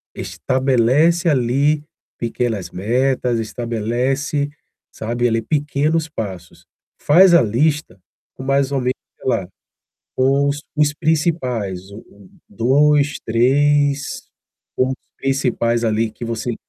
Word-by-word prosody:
Estabelece 135 +7 +1
ali 140 +3 +1 0.3
pequenas 115 -6 -3
metas. 120 +4 0
Estabelece, 120 +6 -2 0.4
sabe, 120 +2 -1
ali, 115 -1 +1
pequenos 150 +5 0
passos. 95 - -7 0.3
Faz 175 +4 +6
a 170 - +7
lista 130 - 0 0.4
com - - -10
mais 135 0 +1
ou 135 - 0
menos, 125 +1 0 0.2
sei - - -9
lá, 95 -8 0 0.7
com 135 +2 +2
os 145 +1 -2 0.2
os 150 -1 +3
principais, 130 - -1
o 100 - -10
o 100 -2 -19 0.2
2, 145 +4 +2
3, 140 +4 +2 0.5
pontos 130 +1 +1 0.2
principais, 125 -3 0
ali, 110 0 +1
que 120 - -8
você 115 0 -3
130 Hz, 110 wpm, -19 LUFS, 115-145 Hz, 0.7 s, a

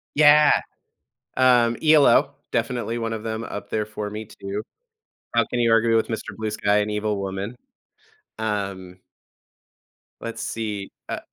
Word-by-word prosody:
Yeah. 150 0 +6 0.8
Um, 120 -2 +4
ELO, 145 -2 +5 0.2
definitely 115 0 -1
one 115 -1 -2
of 110 -1 -5
them 110 0 -3
up 105 - -7
there 105 -1 -1
for 105 -1 -5
me 110 +1 -6
too. 100 0 -6 0.7
How - - +4
can 125 - -1
you 115 -1 +3
argue 115 0 +4
with 110 - +1
Mr. 110 -2 -5
Blue 110 -1 -3
Sky, 105 -1 +1
and 105 0 0
Evil 105 0 -1
Woman? 100 +4 -4 0.8
Um 100 -4 -3 1.2
Let's 115 -1 -5
see, 105 -3 -4 0.2
uh - - -3
110 Hz, 145 wpm, -23 LUFS, 105-115 Hz, 1.2 s, Yeah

